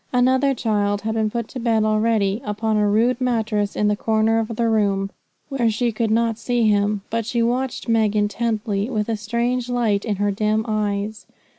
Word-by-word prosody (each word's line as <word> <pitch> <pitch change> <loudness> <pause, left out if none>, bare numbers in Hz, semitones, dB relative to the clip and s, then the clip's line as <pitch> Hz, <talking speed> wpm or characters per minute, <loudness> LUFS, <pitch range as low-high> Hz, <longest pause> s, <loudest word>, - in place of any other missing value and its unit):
Another 260 +2 +3
child 205 -3 0
had 220 +1 -2
been 220 -1 0
put 235 0 -3
to 260 - -6
bed 230 -2 +1
already, 215 -1 +1
upon 215 0 -1
a 210 0 +2
rude 235 +5 +2
mattress 220 -4 0
in 210 0 +2
a - - +1
corner 220 +1 +1
of 225 0 -3
the 230 +1 +1
room, 200 -3 +1 0.4
where 255 -5 +1
she 235 +2 0
could 225 0 -1
not 225 0 +1
see 240 -1 +1
him; 205 0 +1
but 230 0 0
she 235 +1 -1
watched 250 +2 -1
Meg 220 -2 +2
intently, 210 0 -1
with 215 -4 -1
a 225 - +1
strange 235 +3 -2
light 230 -5 +1
in 215 -3 -1
her 205 +1 0
dim 215 +2 0
eyes. 210 0 -2
220 Hz, 190 wpm, -21 LUFS, 210-235 Hz, 0.4 s, Another